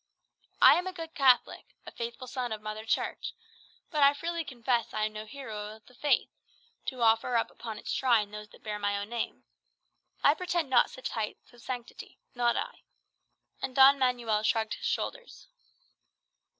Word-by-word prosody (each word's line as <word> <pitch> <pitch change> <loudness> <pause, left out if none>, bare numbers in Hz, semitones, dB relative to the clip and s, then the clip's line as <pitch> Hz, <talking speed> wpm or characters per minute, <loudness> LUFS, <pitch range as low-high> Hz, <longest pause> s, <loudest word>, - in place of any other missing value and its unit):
I - - +9
am 360 - -4
a 370 - -4
good 330 -2 -7
Catholic, 260 -4 +3
a - - -8
faithful 235 +2 -6
son 250 -1 -4
of 215 - -3
Mother 215 +1 -6
Church; - - -2 0.6
but 305 -3 0
I 280 +1 +7
freely 335 +2 -3
confess 245 -5 -1
I 215 0 +1
am 215 - -4
no 215 0 -7
hero 215 -5 -7
of 220 - -20
the 250 - -19
Faith, 290 +3 +1 0.6
to 255 -3 -2
offer 225 +2 +3
up 230 - +1
upon 220 -2 -7
its - - -6
shrine 225 -5 +2
those 210 0 -8
that - - -18
bear 210 -1 -4
my 205 0 0
own 200 +1 -5
name. 235 -1 -4 0.8
I 285 - +7
pretend 345 -4 -2
not 245 - +6
to - - -16
such 260 - -5
heights 220 +2 -5
of 240 - -16
sanctity, 245 -2 -7 0.2
not 240 -2 +2
I." - - -4 0.8
And 260 -1 -4
Don 275 +1 +8
Manuel 240 -4 +1
shrugged 220 0 +1
his - - -4
shoulders. - - -4
240 Hz, 180 wpm, -30 LUFS, 220-275 Hz, 0.8 s, I